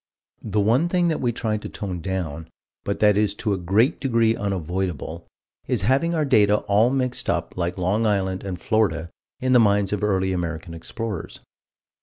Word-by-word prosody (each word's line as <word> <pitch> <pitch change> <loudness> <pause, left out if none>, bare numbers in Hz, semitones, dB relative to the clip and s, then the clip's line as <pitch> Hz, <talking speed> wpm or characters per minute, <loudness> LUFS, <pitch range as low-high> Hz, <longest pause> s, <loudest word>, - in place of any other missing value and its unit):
The 105 - -1
one 120 +11 +3
thing 175 -1 +2
that 160 - -1
we 120 -2 +1
try 110 -2 -2
to 105 - -7
tone 95 -4 -5
down 80 -4 -4 0.4
but 100 - -2
that 105 -1 +5
is 105 -1 +1
to 105 -2 -1
a - - -1
great 105 - +2
degree 115 -4 +2
unavoidable 90 - -3 0.4
is - - 0
having 140 - +2
our 155 -2 +1
data 105 -6 +4
all 105 +4 +3
mixed 130 -1 -1
up - - -1
like 90 0 -2
Long 100 +5 +1
Island 95 -2 0
and 95 -3 -5
Florida 85 -8 0 0.3
in 130 0 +2
the 125 - +7
minds 100 -2 +3
of 105 - -2
early 95 -2 +1
American 85 -2 -4
explorers. 105 +3 -6
105 Hz, 180 wpm, -23 LUFS, 95-115 Hz, 0.4 s, the